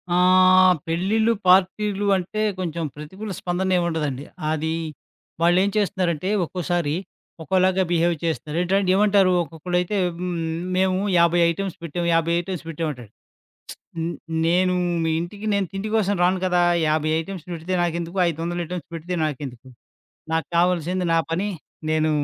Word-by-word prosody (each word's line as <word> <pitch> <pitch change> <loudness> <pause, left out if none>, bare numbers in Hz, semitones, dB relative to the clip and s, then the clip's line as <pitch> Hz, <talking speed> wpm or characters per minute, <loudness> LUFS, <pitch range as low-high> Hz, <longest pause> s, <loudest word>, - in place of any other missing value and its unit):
ఆహ్, 185 0 +6
పెళ్ళిళ్ళు, 205 +7 +1
పార్టీలు 195 +2 +3
అంటే 190 +4 -3 0.2
కొంచెం 170 -2 -3
ప్రతికూల 190 +8 -7
స్పందన 185 +1 -1
ఏముండదండి. 155 -6 -1 0.3
అది, 160 +1 -1 0.7
వాళ్ళేం 175 +4 +4
చేస్తున్నారంటే 185 -4 0 0.2
ఒక్కోసారి, 175 -3 -1 0.5
ఒకోలాగా 185 +2 +2
బిహేవ్ 170 0 +2
చేస్తున్నారు. 160 -1 -2
ఎంటం 190 +1 +1
ఏమంటారు 200 -2 +4
ఒక్కొక్కళైతే 175 +5 -2 0.2
హ్మ్, 180 0 -3 0.4
మేము 185 0 +2 0.2
50 170 0 +4
ఐటమ్స్ 190 +1 -4
పెట్టాం, 170 +1 -3
50 165 0 +2
ఐటమ్స్ 180 -1 -6
పెట్టాంమంటాడు. 145 -9 -5 0.9
హ్మ్, 165 +1 -2 0.3
నేను 180 +2 +3 0.3
మీ 160 - +1
ఇంటికి 200 +5 -6
నేను 200 -1 +1
తిండి 195 +2 -4
కోసం 205 -2 +1
రాను 185 +1 +3
కదా! 180 -1 +2 0.2
50 155 0 +1
ఐటమ్స్ 180 0 -7
పెడితే 170 +2 -3
నాకెందుకు 170 +1 -2
500 170 +2 -3
ఐటెమ్స్ 175 -2 -6
పెడితే 170 +2 -4
నాకెందుకు. 135 -4 -5 0.6
నాకు 160 0 0
కావాల్సింది 180 +1 +1
నా - - +4
పని, 185 +5 -1 0.4
నేను 155 0 +2
175 Hz, 130 wpm, -23 LUFS, 165-185 Hz, 0.9 s, ఆహ్